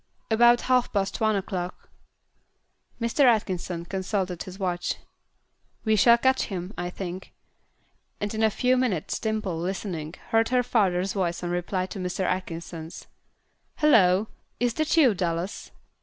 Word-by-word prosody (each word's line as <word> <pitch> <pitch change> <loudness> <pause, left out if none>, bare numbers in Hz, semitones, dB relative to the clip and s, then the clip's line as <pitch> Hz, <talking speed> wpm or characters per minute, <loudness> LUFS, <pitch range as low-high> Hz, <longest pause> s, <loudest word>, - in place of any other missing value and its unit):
"About 240 +2 +5
half 255 -1 +2
past 200 0 -1
one 215 -1 +3
o'clock." 185 -2 -4 1.1
Mr. 235 +5 +1
Atkinson 185 -7 +1
consulted 190 -1 -2
his 185 0 -7
watch. 180 -2 -1 0.9
"We 220 0 +3
shall 235 +3 +6
catch 260 +2 +2
him, 185 -1 -5
I 175 0 -3
think." 185 0 -7 0.9
And 205 +1 -3
in 220 - -2
a 220 - +5
few 250 +4 +2
minutes 225 -11 -1
Dimple, 215 -6 -2
listening, 175 -3 -4
heard 225 0 +3
her 250 0 +3
father's 190 -5 +1
voice 180 -4 -1
in 175 - -2
reply 180 +1 -1
to 195 - -7
Mr. 180 +1 -3
Atkinson's 170 -2 -4 0.7
"Hallo! 205 -9 +4 0.3
is 240 0 +1
that 310 +4 0
you, 270 -8 +6
Dallas?" 175 0 -3
195 Hz, 140 wpm, -26 LUFS, 180-225 Hz, 1.1 s, shall